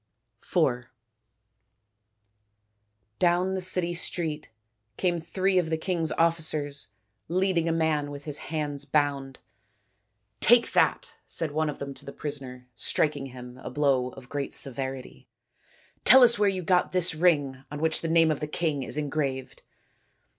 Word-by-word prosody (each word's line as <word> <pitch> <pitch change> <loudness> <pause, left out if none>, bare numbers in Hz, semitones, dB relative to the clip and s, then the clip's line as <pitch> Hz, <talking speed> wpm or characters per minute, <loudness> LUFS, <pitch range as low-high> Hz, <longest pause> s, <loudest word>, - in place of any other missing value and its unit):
IV 120 0 0 2.3
Down 180 +2 +2
the 190 - -2
city 180 -1 +2
street 160 -3 -2 0.5
came 175 -2 0
three 185 +3 +1
of 165 -3 -1
the 160 - 0
king's 165 -1 -1
officers 155 -4 0 0.4
leading 180 -2 +1
a - - +2
man 160 -3 0
with 145 0 -8
his 150 -1 -3
hands 145 -3 -2
bound. 140 -2 -1 0.5
" 105 0 -49
Take 240 0 +5
that," - - +1
said 165 -3 -2
one 155 +1 0
of 145 - -5
them 140 0 -6
to - - -9
the 140 - -8
prisoner, 130 -4 -7
striking 135 +5 -1
him 125 -1 -11
a - - -7
blow 135 -4 +1
of 130 -2 -12
great 140 +1 -4
severity, 135 -1 -3 0.4
" - - -32
and - - -41
tell 260 +2 +9
us 235 -2 +5
where 205 -1 +4
you 185 -2 -3
got 180 +1 +2
this 180 -2 +2
ring 145 -6 +1
on 145 - -6
which 160 +1 0
the 165 - -2
name 165 -1 +4
of 150 - -2
the 150 - -3
king 150 -2 -1
is 135 - -4
engraved." 140 -3 -3
150 Hz, 155 wpm, -27 LUFS, 140-170 Hz, 2.3 s, tell